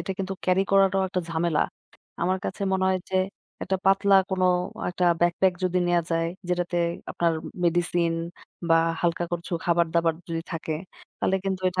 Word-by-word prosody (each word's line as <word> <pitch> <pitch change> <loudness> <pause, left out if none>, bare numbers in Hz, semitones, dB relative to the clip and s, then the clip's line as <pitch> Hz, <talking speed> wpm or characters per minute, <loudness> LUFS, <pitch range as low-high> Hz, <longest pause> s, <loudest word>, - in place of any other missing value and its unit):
এটা - - -5
কিন্তু 195 0 -2
carry 185 +1 +3
করাটাও 195 -1 +4
একটা 185 0 -1
ঝামেলা। 165 -1 +1 0.6
আমার 185 +2 +1
কাছে - - -4
মনে 190 0 +1
হয় 190 0 +2
যে 190 - +1 0.5
একটা 190 0 0
পাতলা 195 +1 +4 0.2
কোন 190 -1 0 0.5
একটা 180 0 -1 0.2
Bag 175 0 +3
pack 190 -1 +5
যদি 180 0 +1
নেয়া 175 -1 +2
যায় 165 0 +1 0.2
যেটাতে 175 0 -1 0.3
আপনার 170 -1 +1 0.3
মেডিসিন 170 0 +1 0.6
বা 165 - +6 0.2
হালকা 175 0 +1
কচু 175 +1 -4
খাবার-দাবার 170 -1 +2
যদি 165 -1 -2
থাকে 160 -1 -3 0.4
তাহলে 190 - +1
কিন্তু 190 -1 -1
এটা 185 0 -1
175 Hz, 165 wpm, -25 LUFS, 170-190 Hz, 0.6 s, বা